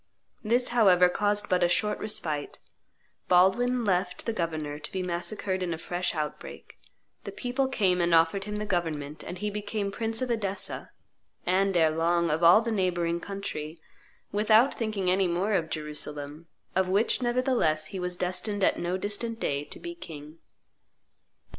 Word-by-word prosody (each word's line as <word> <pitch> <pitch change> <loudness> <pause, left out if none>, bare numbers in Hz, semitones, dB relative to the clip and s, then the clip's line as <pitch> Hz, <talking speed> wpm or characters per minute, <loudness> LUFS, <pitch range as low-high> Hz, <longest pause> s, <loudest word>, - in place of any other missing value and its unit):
This, 240 +3 +2
however, 190 -7 +5
caused 205 +2 +1
but 180 -1 +2
a - - +5
short 210 +4 +1
respite; 155 -9 -2 0.7
Baldwin 230 +7 +3
left 180 -2 0
the 230 - -1
governor 155 -5 -3
to - - -6
be 190 -1 -2
massacred 185 +2 -2
in 175 -2 -1
a - - -9
fresh 175 +2 -2
outbreak; 150 -1 -6 0.4
the - - -6
people 260 +2 -1
came 190 -9 +1
and 170 0 +1
offered 165 +4 +3
him 210 0 -4
the 210 0 -3
government, 155 -6 -2
and 180 - -6
he 210 +2 -3
became 205 0 -3
Prince 225 +1 -1
of 255 -1 -1
Edessa, 200 -4 -2 0.6
and, 190 +1 +2
ere 160 -2 +4
long, 170 +1 +1
of 155 +2 0
all 175 +6 +8
the 230 0 -2
neighboring 175 -4 0
country, 170 -5 -6 0.5
without 215 +5 +4
thinking 210 -5 -1
any 190 0 +3
more 180 +5 0
of 165 -5 0
Jerusalem, 150 0 -5 0.3
of 190 0 +2
which, 205 +7 +2
nevertheless, 240 - +1
he 190 - -3
was 180 0 -3
destined 185 +3 -2
at - - +3
no 175 +2 -1
distant 215 +4 -3
day 140 0 -1
to - - -8
be 345 0 -6
king. 155 - -10
185 Hz, 165 wpm, -28 LUFS, 170-210 Hz, 0.7 s, all